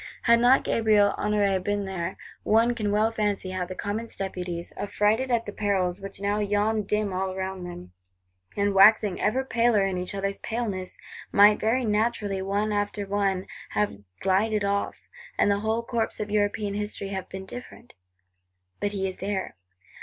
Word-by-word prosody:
Had 235 Hz, 0 st, +5 dB
not 245 Hz, +3 st, +5 dB
Gabriel 210 Hz, -3 st, +3 dB
Honoré 200 Hz, -3 st, +1 dB
been 205 Hz, 0 st, -1 dB
there,—one 200 Hz, +5 st, 0 dB
can 215 Hz, -4 st, -2 dB
well 215 Hz, +2 st, +2 dB
fancy, 205 Hz, -4 st, -1 dB
how 185 Hz, -1 st, -3 dB
the 185 Hz, -, -6 dB
Commons 215 Hz, +4 st, -4 dB
Deputies, 180 Hz, -3 st, -5 dB
affrighted 210 Hz, +5 st, +1 dB
at 235 Hz, -2 st, +1 dB
the 205 Hz, -, -5 dB
perils 195 Hz, -3 st, -1 dB
which 195 Hz, -1 st, -8 dB
now 200 Hz, +1 st, 0 dB
yawned 210 Hz, 0 st, 0 dB
dim 210 Hz, -2 st, 0 dB
all 185 Hz, 0 st, -2 dB
round 190 Hz, 0 st, -4 dB
them, 175 Hz, -, -8 dB, 0.7 s
and 200 Hz, 0 st, +2 dB
waxing 200 Hz, 0 st, +5 dB
ever 260 Hz, +5 st, +1 dB
paler 230 Hz, -4 st, +3 dB
in 190 Hz, -2 st, -1 dB
each 180 Hz, +2 st, -5 dB
other's 195 Hz, 0 st, -2 dB
paleness, 210 Hz, -6 st, -4 dB, 0.3 s
might 205 Hz, +1 st, +6 dB
very 240 Hz, +3 st, +1 dB
naturally, 210 Hz, -2 st, 0 dB
one 200 Hz, +2 st, -1 dB
after 205 Hz, 0 st, -1 dB
one, 195 Hz, -1 st, 0 dB, 0.3 s
have 205 Hz, -, 0 dB, 0.2 s
glided 205 Hz, +2 st, +2 dB
off; 200 Hz, 0 st, -2 dB, 0.3 s
and 205 Hz, -, +3 dB
the 200 Hz, -, +1 dB
whole 220 Hz, +2 st, -1 dB
course 230 Hz, -1 st, -2 dB
of 210 Hz, -1 st, -4 dB
European 205 Hz, 0 st, 0 dB
History 205 Hz, -1 st, -4 dB
have 190 Hz, -2 st, -5 dB
been 190 Hz, 0 st, -7 dB
different! 245 Hz, +2 st, -10 dB, 0.9 s
But 205 Hz, 0 st, -1 dB
he 195 Hz, -1 st, -1 dB
is 185 Hz, -, -6 dB
there. 195 Hz, 0 st, -3 dB
205 Hz, 165 wpm, -26 LUFS, 190-215 Hz, 0.9 s, might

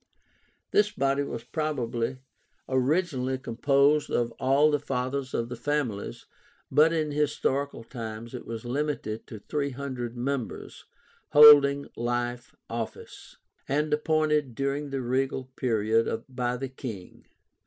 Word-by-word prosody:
This 210 Hz, 0 st, +4 dB
body 140 Hz, -4 st, 0 dB
was 120 Hz, -5 st, -4 dB
probably 130 Hz, -4 st, -2 dB, 0.5 s
originally 130 Hz, -1 st, +1 dB
composed 140 Hz, +4 st, +2 dB
of 120 Hz, -1 st, 0 dB
all 140 Hz, +4 st, +4 dB
the 145 Hz, -, +2 dB
Fathers 130 Hz, -1 st, -3 dB
of 115 Hz, -, -1 dB
the 120 Hz, -, -6 dB
families, 125 Hz, -5 st, -2 dB, 0.5 s
but 150 Hz, +4 st, +5 dB
in 155 Hz, -2 st, 0 dB
historical 140 Hz, -3 st, -1 dB
times 115 Hz, -1 st, -7 dB
it 125 Hz, -, -7 dB
was 115 Hz, 0 st, -6 dB
limited 125 Hz, -4 st, -3 dB
to 110 Hz, -, -8 dB
THREE 140 Hz, +7 st, -2 dB
HUNDRED 125 Hz, -3 st, -5 dB
members, 130 Hz, -1 st, -4 dB, 0.5 s
holding 145 Hz, -1 st, +8 dB
life 120 Hz, +1 st, -3 dB
office, 115 Hz, -1 st, -7 dB, 0.3 s
and 150 Hz, +2 st, +1 dB
appointed 150 Hz, -4 st, +1 dB
during 140 Hz, +2 st, -2 dB
the 135 Hz, -1 st, -3 dB
regal 130 Hz, +1 st, -1 dB
period 115 Hz, -1 st, +1 dB
by 125 Hz, -2 st, -2 dB
the 135 Hz, +1 st, -4 dB
king. 115 Hz, -8 st, -9 dB
130 Hz, 120 wpm, -27 LUFS, 120-145 Hz, 0.5 s, holding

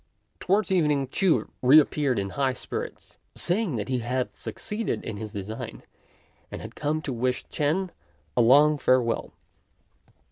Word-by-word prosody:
Towards 195 Hz, +2 st, +1 dB
evening 150 Hz, -7 st, +2 dB
Ch'u 185 Hz, +3 st, +2 dB
re 135 Hz, +5 st, +8 dB
appeared 140 Hz, -4 st, +1 dB
in 100 Hz, -1 st, -2 dB
high 135 Hz, +1 st, 0 dB
spirits, -, -, -6 dB, 0.2 s
saying 180 Hz, -, 0 dB
that 105 Hz, -3 st, -3 dB
he 130 Hz, -1 st, 0 dB
had 125 Hz, +2 st, -2 dB
succeeded 220 Hz, +1 st, -4 dB
in 105 Hz, -, -5 dB
his 110 Hz, 0 st, -6 dB
design, 110 Hz, +4 st, -6 dB, 0.7 s
and -, -, -7 dB
had -, -, -9 dB
come 155 Hz, +1 st, -2 dB
to 135 Hz, -, -3 dB
wish 125 Hz, +1 st, -1 dB
Ch'ên 165 Hz, +5 st, 0 dB, 0.4 s
a 120 Hz, -, +4 dB
long 145 Hz, +5 st, +6 dB
farewell. 125 Hz, -3 st, +1 dB
135 Hz, 145 wpm, -26 LUFS, 120-155 Hz, 0.7 s, re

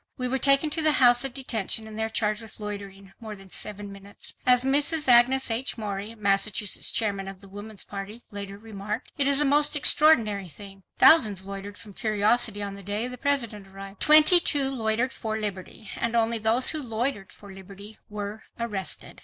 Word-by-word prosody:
"We 250 Hz, -, -3 dB
were 265 Hz, +2 st, -2 dB
taken 275 Hz, +3 st, +3 dB
to 320 Hz, -, 0 dB
the 310 Hz, -1 st, +3 dB
House 245 Hz, -2 st, +5 dB
of 270 Hz, -, 0 dB
Detention 225 Hz, -4 st, 0 dB
and 215 Hz, -, -11 dB
there 220 Hz, 0 st, -3 dB
charged 215 Hz, 0 st, -2 dB
with 220 Hz, -1 st, -13 dB
'loitering 200 Hz, -2 st, -9 dB
more 220 Hz, -2 st, -9 dB
than 195 Hz, -1 st, -17 dB
seven 205 Hz, -1 st, -6 dB
minutes'." 200 Hz, +1 st, -12 dB
As 250 Hz, 0 st, +4 dB
Mrs. 295 Hz, +3 st, +3 dB
Agnes 245 Hz, +1 st, +4 dB
H. 245 Hz, +4 st, -3 dB
Morey, 210 Hz, 0 st, -6 dB
Massachusetts 205 Hz, 0 st, 0 dB
Chairman 200 Hz, -3 st, -3 dB
of 195 Hz, -1 st, -10 dB
the 195 Hz, -, -15 dB
Woman's 205 Hz, +1 st, -10 dB
Party, 205 Hz, +4 st, -9 dB
later 200 Hz, -1 st, -8 dB
remarked: 210 Hz, +1 st, -8 dB
"It 280 Hz, -, +2 dB
is 280 Hz, 0 st, +2 dB
a -, -, +1 dB
most 295 Hz, +2 st, +3 dB
extraordinary 230 Hz, -11 st, +2 dB
thing. 195 Hz, +3 st, -12 dB, 0.2 s
Thousands 210 Hz, -, +5 dB
loitered 200 Hz, +1 st, -8 dB
from 210 Hz, -3 st, -13 dB
curiosity 215 Hz, 0 st, +2 dB
on 200 Hz, -1 st, -6 dB
the 200 Hz, -, -10 dB
day 205 Hz, +5 st, -3 dB
the 250 Hz, -, -8 dB
President 235 Hz, -9 st, -1 dB
arrived. 195 Hz, +1 st, -12 dB
Twenty 310 Hz, +3 st, +7 dB
two 285 Hz, -5 st, 0 dB
loitered 235 Hz, +1 st, -2 dB
for 220 Hz, -1 st, -5 dB
liberty, 205 Hz, 0 st, -7 dB
and 235 Hz, 0 st, -3 dB
only 230 Hz, 0 st, +1 dB
those 225 Hz, +4 st, +3 dB
who 310 Hz, -, -4 dB
loitered 230 Hz, -4 st, -4 dB
for 200 Hz, -1 st, -14 dB
liberty 200 Hz, +3 st, -13 dB
were 210 Hz, +1 st, -7 dB, 0.2 s
arrested." 210 Hz, -5 st, -4 dB
220 Hz, 185 wpm, -24 LUFS, 200-250 Hz, 0.2 s, Twenty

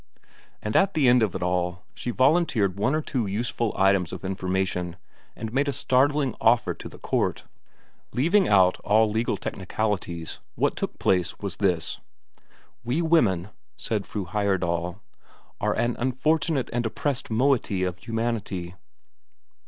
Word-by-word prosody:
And 105 Hz, +1 st, -3 dB
at 195 Hz, 0 st, +4 dB
the 145 Hz, -5 st, +4 dB
end 125 Hz, 0 st, +6 dB
of 105 Hz, -5 st, +1 dB
it -, -, -2 dB
all, 90 Hz, +1 st, -1 dB
she -, -, -5 dB
volunteered 130 Hz, -, +2 dB
one 125 Hz, +8 st, +2 dB
or 155 Hz, -, -1 dB
two 120 Hz, -8 st, -2 dB
useful 115 Hz, +2 st, -1 dB
items 95 Hz, -2 st, +3 dB
of -, -, -7 dB
information, 95 Hz, -2 st, -2 dB, 0.4 s
and 110 Hz, 0 st, -6 dB
made 140 Hz, +2 st, +2 dB
a -, -, +2 dB
startling 135 Hz, 0 st, +2 dB
offer 120 Hz, +1 st, +3 dB
to -, -, -9 dB
the -, -, -13 dB
court. -, -, -1 dB, 0.7 s
Leaving 175 Hz, +9 st, +3 dB
out 95 Hz, -2 st, +4 dB
all 110 Hz, +1 st, +3 dB
legal 110 Hz, +2 st, 0 dB
technicalities, 95 Hz, -4 st, -3 dB, 0.2 s
what -, -, +1 dB
took -, -, -4 dB
place 90 Hz, -2 st, +1 dB
was 100 Hz, -4 st, -5 dB
this: 90 Hz, -5 st, 0 dB, 0.8 s
"We 125 Hz, +8 st, 0 dB
women," 105 Hz, -, +3 dB, 0.3 s
said 105 Hz, -4 st, -2 dB
Fru 100 Hz, -3 st, -4 dB
Heyerdahl, 90 Hz, -3 st, 0 dB
"we 105 Hz, -, -11 dB
are -, -, +3 dB
an 120 Hz, 0 st, 0 dB
unfortunate 135 Hz, +3 st, 0 dB
and 120 Hz, 0 st, 0 dB
oppressed 130 Hz, +4 st, -2 dB
moiety 115 Hz, -5 st, +1 dB
of 90 Hz, -1 st, -2 dB
humanity. 115 Hz, -6 st, -3 dB
110 Hz, 145 wpm, -25 LUFS, 95-130 Hz, 0.8 s, end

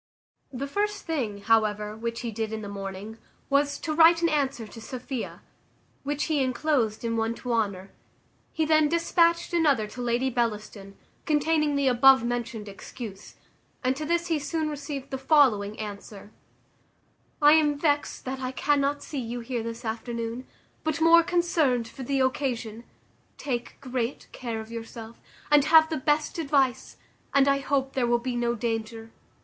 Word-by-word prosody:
The 265 Hz, +1 st, -4 dB
first 410 Hz, +7 st, -2 dB
thing, 235 Hz, -11 st, -2 dB
however, 210 Hz, -1 st, +1 dB
which 230 Hz, +1 st, -4 dB
he 235 Hz, -, -4 dB
did 220 Hz, 0 st, -3 dB
in 220 Hz, -1 st, -4 dB
the -, -, -6 dB
morning, 200 Hz, +2 st, -7 dB, 0.3 s
was, 285 Hz, +1 st, +2 dB
to 310 Hz, -, -2 dB
write 330 Hz, +1 st, +6 dB
an 335 Hz, -, +4 dB
answer 275 Hz, -6 st, -1 dB
to 225 Hz, +2 st, -11 dB
Sophia, 255 Hz, +1 st, -6 dB, 0.6 s
which 290 Hz, +1 st, -2 dB
he 305 Hz, -3 st, +1 dB
inclosed 255 Hz, -4 st, 0 dB
in 230 Hz, 0 st, -1 dB
one 225 Hz, +1 st, 0 dB
to 245 Hz, 0 st, -4 dB
Honour. 200 Hz, -4 st, -1 dB, 0.6 s
He 320 Hz, -, 0 dB
then 310 Hz, -1 st, +4 dB
despatched 335 Hz, +1 st, +2 dB
another 290 Hz, -10 st, +3 dB
to 245 Hz, -, -8 dB
Lady 245 Hz, +2 st, 0 dB
Bellaston, 210 Hz, -4 st, -3 dB, 0.3 s
containing 305 Hz, 0 st, +2 dB
the 280 Hz, -1 st, +1 dB
above 265 Hz, 0 st, +6 dB
mentioned 235 Hz, -2 st, -3 dB
excuse; 200 Hz, +1 st, -9 dB, 0.5 s
and 255 Hz, +1 st, +1 dB
to 305 Hz, -, -5 dB
this 340 Hz, +2 st, 0 dB
he 325 Hz, -3 st, 0 dB
soon 310 Hz, +1 st, -2 dB
received 280 Hz, -2 st, -6 dB
the 265 Hz, -, -3 dB
following 255 Hz, -8 st, +3 dB
answer: 205 Hz, -1 st, -8 dB, 1.1 s
"I 295 Hz, -1 st, +7 dB
am 300 Hz, -2 st, +3 dB
vexed 290 Hz, -1 st, 0 dB
that 265 Hz, 0 st, -4 dB
I 255 Hz, -1 st, -3 dB
cannot 285 Hz, +1 st, 0 dB
see 290 Hz, -, -5 dB
you 240 Hz, 0 st, -4 dB
here 235 Hz, 0 st, -3 dB
this 230 Hz, +1 st, -6 dB
afternoon, 230 Hz, +2 st, -4 dB, 0.4 s
but 315 Hz, 0 st, -1 dB
more 330 Hz, +1 st, +7 dB
concerned 325 Hz, -9 st, +1 dB
for 265 Hz, -, -11 dB
the 270 Hz, +1 st, 0 dB
occasion; 245 Hz, -4 st, -2 dB, 0.5 s
take 245 Hz, -4 st, -4 dB
great 255 Hz, -1 st, -3 dB
care 235 Hz, -3 st, -5 dB
of 220 Hz, +1 st, -11 dB
yourself, 230 Hz, 0 st, -8 dB, 0.3 s
and 290 Hz, -1 st, +6 dB
have 315 Hz, 0 st, +6 dB
the 315 Hz, -, 0 dB
best 295 Hz, +4 st, 0 dB
advice, 275 Hz, -5 st, 0 dB, 0.4 s
and 280 Hz, 0 st, +5 dB
I 275 Hz, 0 st, +3 dB
hope 270 Hz, -1 st, -1 dB
there 250 Hz, -3 st, +1 dB
will 240 Hz, 0 st, +3 dB
be 245 Hz, +1 st, -4 dB
no 240 Hz, 0 st, 0 dB
danger. 225 Hz, 0 st, -4 dB
255 Hz, 165 wpm, -26 LUFS, 225-295 Hz, 1.1 s, I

